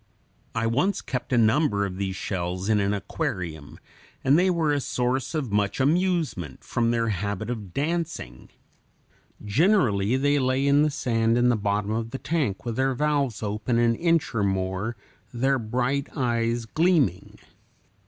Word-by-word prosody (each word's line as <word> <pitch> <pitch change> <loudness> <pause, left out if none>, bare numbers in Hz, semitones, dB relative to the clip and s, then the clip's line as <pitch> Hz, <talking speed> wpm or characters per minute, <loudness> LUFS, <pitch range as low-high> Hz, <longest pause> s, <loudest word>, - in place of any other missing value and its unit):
I 115 0 0
once 145 +13 +1
kept 125 -1 -5
a 125 - +3
number 110 -2 +3
of 95 -2 -5
these 95 -1 -2
shells 90 +1 -3
in 105 -1 +3
an 100 0 +1
aquarium, 85 -6 -4 0.5
and 135 +2 +4
they 180 +3 +4
were 165 -4 +1
a 145 - +1
source 125 +4 -1
of 135 -8 -2
much 105 +2 0
amusement, 155 - 0
from 115 -1 0
their 115 -1 +1
habit 105 +3 -2
of 105 -6 -6
dancing 150 - -3 0.9
(Fig. - - -18
86). 105 -1 -7
Generally 130 - +3
they 145 +1 +2
lay 130 +1 +1
in 140 +1 +4
the 150 - +3
sand 115 -5 +1
in 120 0 +4
the 120 - +3
bottom 105 0 -1
of 115 +1 -2
the 135 - -5
tank 135 - -2
with 115 -2 -3
their 135 0 +1
valves 140 -5 0
open 105 +3 -1
an 120 0 +3
inch 165 +2 +1
or 115 - 0
more, 95 +3 -1 0.4
their 135 +2 +1
bright 125 +5 -1
eyes 120 -2 0
gleaming. 150 - +1
120 Hz, 165 wpm, -25 LUFS, 105-140 Hz, 0.9 s, and